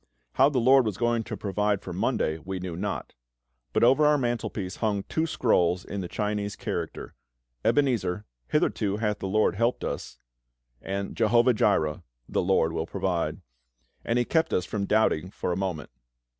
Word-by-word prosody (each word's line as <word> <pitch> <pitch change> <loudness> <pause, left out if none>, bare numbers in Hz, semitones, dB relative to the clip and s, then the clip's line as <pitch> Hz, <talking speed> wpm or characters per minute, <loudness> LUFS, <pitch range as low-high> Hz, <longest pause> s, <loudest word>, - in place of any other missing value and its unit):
How 135 +2 +5
the 140 - -2
LORD 130 +2 +6
was 100 -3 -3
going 120 0 +1
to 110 -2 -5
provide 105 0 0
for 90 - -6
Monday 80 -3 0
we 95 +4 -5
knew 90 -2 -5
not; 100 +4 -4 0.6
but - - +1
over 130 +5 +5
our 150 0 +4
mantelpiece 115 -7 -2
hung 105 -3 0
two 160 +8 -1
scrolls 90 - +1
in 100 - -4
the 90 - -4
Chinese 105 +1 -2
character - - -5 0.5
Ebenezer, 110 -9 +1 0.2
"Hitherto 100 -1 +1
hath 105 -2 -1
the - - -3
LORD 110 +3 +2
helped 120 +3 +1
us"; - - -5 0.6
and 100 +1 -4
Jehovah 120 +3 +4
Jireh, 80 -7 +1 0.3
"The - - 0
LORD 90 -3 +2
will 80 0 -2
provide" 95 -3 -2 0.6
and 115 - 0
He 120 - +2
kept 160 +3 +1
us 90 - +1
from 100 0 -2
doubting 95 -6 +2
for 90 - -3
a - - 0
moment. 90 -7 -3
105 Hz, 170 wpm, -27 LUFS, 95-120 Hz, 0.6 s, LORD